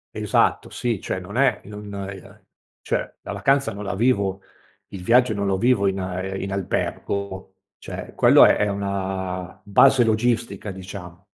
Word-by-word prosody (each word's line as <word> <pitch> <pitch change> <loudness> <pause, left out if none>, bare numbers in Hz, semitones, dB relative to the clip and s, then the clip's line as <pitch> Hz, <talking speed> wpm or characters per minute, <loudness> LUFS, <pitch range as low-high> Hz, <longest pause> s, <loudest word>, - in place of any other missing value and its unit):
Esatto, - - +1
sì, 115 -5 -2
cioè, - - -3
non 100 +6 -7
è, 130 -5 +3
non, 105 0 -9
ehm 100 -1 -8 0.4
cioè, - - -3
la - - -7
vacanza 135 -5 +1
non 105 +1 -7
la 100 - -3
vivo 100 -3 +1 0.5
il 95 -2 -8
viaggio 125 +2 +4
non 100 0 -1
lo 95 -1 +1
vivo 120 -4 +3
in 95 0 0
a 95 0 -3
in 95 0 -4
albergo 95 0 -3 0.2
cioè, - - -8
quello - - +7
è - - +5
è 105 - +1
una 95 -2 -4
base 125 +5 +5
logistica 110 -2 0
diciamo. 90 -2 -10
100 Hz, 160 wpm, -23 LUFS, 95-110 Hz, 0.5 s, quello